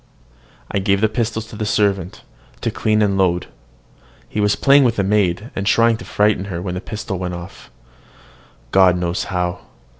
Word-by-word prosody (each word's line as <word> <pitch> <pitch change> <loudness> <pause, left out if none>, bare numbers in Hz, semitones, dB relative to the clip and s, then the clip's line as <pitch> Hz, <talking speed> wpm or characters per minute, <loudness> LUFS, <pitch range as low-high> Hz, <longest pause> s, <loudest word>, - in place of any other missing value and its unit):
I 100 - 0
gave 100 0 +1
the 110 - +3
pistols 110 0 -2
to - - -10
the 110 - -4
servant, 100 -4 0 0.4
to - - -1
clean 110 -1 +1
and 100 -1 +1
load. 90 -2 +1 0.8
He - - -4
was 105 -1 +2
playing 140 0 +5
with 120 -3 +2
the 100 - 0
maid, 100 +1 0
and 100 - -3
trying 115 +1 +4
to - - -10
frighten 105 -2 +1
her, 90 -4 -5
when 90 0 -4
the 90 - -4
pistol 105 -4 -5
went 90 -1 -3
off 85 +2 -10 1.0
God 95 -2 +5
knows 90 -1 -2
how! 90 -1 -2
100 Hz, 180 wpm, -19 LUFS, 90-105 Hz, 1.0 s, playing